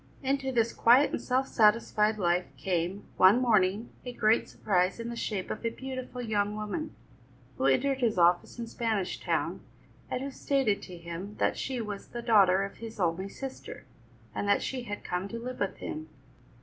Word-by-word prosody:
Into 270 0 0
this 235 -2 +1
quiet 250 +5 +5
and - - -2
self 260 +1 0
satisfied 215 -1 +3
life 175 -2 +1
came, 175 +5 -1
one 190 +6 +7
morning, 215 -2 +2
a 250 - -5
great 220 -1 +2
surprise 185 0 0
in 230 0 -4
the 235 - -5
shape 205 -5 -3
of 215 - -5
a 230 - +1
beautiful 255 0 -6
young 210 -2 0
woman, 215 +9 -4 0.6
who 135 - +3
entered 270 - +2
his 230 -5 +1
office 175 +4 +3
in 235 - -4
Spanish 225 -4 -2
Town, - - -1 0.5
and 255 - -2
who 275 - -4
stated 265 -7 0
to 180 -2 -9
him 170 +4 -7
that - - +1
she 260 -2 -3
was 210 -3 -5
the 240 0 -7
daughter 195 -5 +5
of 195 - -6
his 225 -1 -9
only 180 +2 0
sister, 270 +5 -8 0.5
and 205 - -2
that 200 - +3
she 255 -2 -3
had 205 -2 -5
come 180 +2 -2
to 230 - -6
live 250 +2 -6
with 200 - -1
him. 155 +1 -6
215 Hz, 185 wpm, -29 LUFS, 190-245 Hz, 0.6 s, one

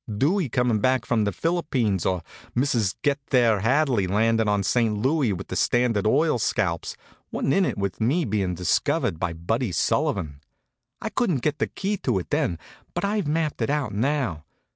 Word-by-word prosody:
Dewey 145 - +1
comin' 120 -2 +1
back 130 +2 +1
from 110 -3 +1
the 100 - 0
Philippines, 130 - 0
or 90 -3 -1 0.3
Mr. 120 -7 +1
Get 145 -1 +2
There 120 -5 +4
Hadley 125 -2 +2
landin' 110 +3 +2
in 100 -1 +1
St. 110 +1 +1
Louis 135 +1 +1
with 95 0 -5
the - - -4
Standard 115 +1 +2
Oil 145 +2 +2
scalps, 90 -6 -1 0.3
wa'n't 135 - 0
in 195 - +3
it - - -2
with 100 +1 -3
me 145 +10 +2
bein' 100 -5 -1
discovered 85 -2 0
by 85 -1 -1
Buddy 110 +7 -2
Sullivan. 75 -3 0 0.6
I 220 - -1
couldn't 185 - 0
get 150 0 0
the - - +1
key 200 +1 -3
to 100 - 0
it 90 - -5
then, 85 - 0 0.4
but - - 0
I've 205 -4 -1
mapped 155 0 -1
it - - 0
out 145 -5 -1
now. 120 - -1
115 Hz, 180 wpm, -24 LUFS, 100-145 Hz, 0.6 s, There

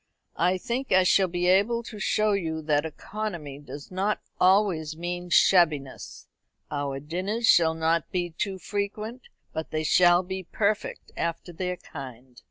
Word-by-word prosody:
"I 180 +2 +3
think 245 +7 -3
I 185 0 +6
shall 185 +1 +4
be 175 0 -2
able 205 +6 +3
to 220 -2 -9
show 215 0 +2
you 160 -5 -2
that 150 0 +1
economy 170 -5 -6
does 145 +1 -10
not 195 +3 0 0.2
always 180 -5 +3
mean 175 +1 -4
shabbiness. 155 -7 +2 0.4
Our 140 -2 -2
dinners 185 - -2
shall 160 -4 +5
not 160 0 0
be 175 -2 -2
too 190 +4 -3
frequent, 210 +5 -4 0.3
but 160 - -4
they 155 0 -2
shall 175 +2 +5
be 190 +1 -5
perfect 205 +3 -2
after 170 +1 -3
their 180 +1 -3
kind." 130 -5 -10
175 Hz, 150 wpm, -26 LUFS, 160-200 Hz, 0.4 s, I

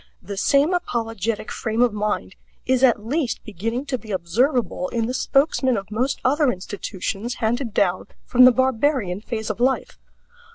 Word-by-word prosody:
The 200 +2 -6
same 280 - +3
apologetic 225 - -2
frame 225 +1 0
of 240 -3 +2
mind 210 - -2 0.3
is 260 0 +2
at 235 -5 +4
least 270 0 -1
beginning 230 - -4
to 260 -3 -2
be 215 - -14
observable 200 - 0
in 230 -2 -1
the 250 - -3
spokesmen 265 -2 +2
of 200 +1 -6
most 255 +6 -1
other 285 +1 +3
institutions 200 +3 -5
handed 235 +2 -1
down 185 -3 +1 0.2
from 255 0 +6
the 255 - +9
barbarian 260 -6 +1
phase 220 -1 -3
of 215 - -8
life. 260 +2 0
230 Hz, 160 wpm, -22 LUFS, 210-260 Hz, 0.3 s, the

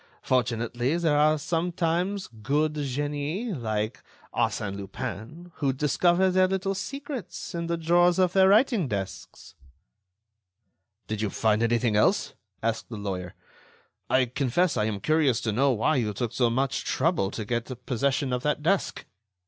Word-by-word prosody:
Fortunately, 120 +3 0
there 165 -4 +2
are 155 +1 +4
sometimes 175 +4 -1
good 140 +8 -1
genii 145 - -2
like 110 -4 -2 0.3
Arsène 100 -2 -1
Lupin 110 - -7
who 140 -3 +1
discover 175 +7 +2
their 185 0 +4
little 190 +1 -1
secrets 270 +4 -6
in 170 -1 -3
the 170 0 -1
drawers 175 +2 +3
of 185 -1 +3
their 190 0 +6
writing 215 - +4
desks." 100 -5 -6 1.5
"Did 110 -1 -3
you 105 - 0
find 110 +1 +1
anything 115 -1 +2
else?" 105 - +2 0.3
asked 115 0 -1
the 115 - -6
lawyer. 95 -3 -5 0.7
"I 130 0 +4
confess 140 +7 0
I 105 - +1
am 105 -2 -3
curious 150 -3 +2
to 110 - -1
know 135 +6 +3
why 125 +6 +1
you 105 -4 -1
took 120 +1 -2
so 120 -2 +2
much 130 +3 0
trouble 155 - +1
to 110 +1 -5
get 120 +2 -4
possession 135 +1 0
of 125 - -1
that 150 +1 -1
desk." 190 +4 0
140 Hz, 150 wpm, -26 LUFS, 115-175 Hz, 1.5 s, their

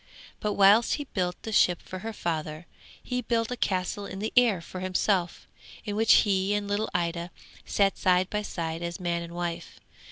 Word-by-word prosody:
But 210 -1 -1
whilst 205 +4 +5
he 290 - -4
built 180 -9 -2
the 220 - -5
ship 180 -4 +4
for 185 - -8
her 225 +4 -5
father, 160 -4 -4 0.4
he 250 0 -2
built 230 0 -1
a - - -1
castle 200 -1 -2
in - - -7
the 215 +3 -3
air 240 -7 +5
for 175 +2 -8
himself, 185 -1 0 0.4
in 205 -2 -3
which 225 +1 +5
he 195 0 +1
and 205 -1 -2
little 205 +2 -1
Ida 170 0 -2 0.4
sat 195 -1 +1
side 185 -1 +3
by 210 +2 -2
side 165 -5 -4
as 170 +2 -4
man 170 -1 -1
and 170 0 -8
wife. 175 -1 -5
190 Hz, 190 wpm, -27 LUFS, 175-210 Hz, 0.4 s, whilst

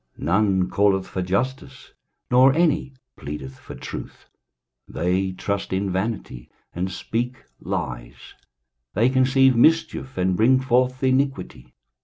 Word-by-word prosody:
23:059:004 - - -7
None 95 +1 +2
calleth 100 -2 +2
for 95 - -4
justice, 130 +8 -3 0.4
nor 130 +2 +6
any 155 -5 +1 0.2
pleadeth 70 -3 -7
for - - -10
truth: - - -9 0.6
they 90 +3 -1
trust 100 +2 -3
in 95 +1 -1
vanity, 95 - -4 0.2
and 90 +2 -3
speak 120 +6 -4 0.2
lies; - - -6 0.6
they 115 +6 +3
conceive 130 0 +4
mischief, 160 0 +2
and 90 0 +1
bring 125 +6 +4
forth 130 0 +1
iniquity. 130 - -1
110 Hz, 120 wpm, -23 LUFS, 95-130 Hz, 0.6 s, nor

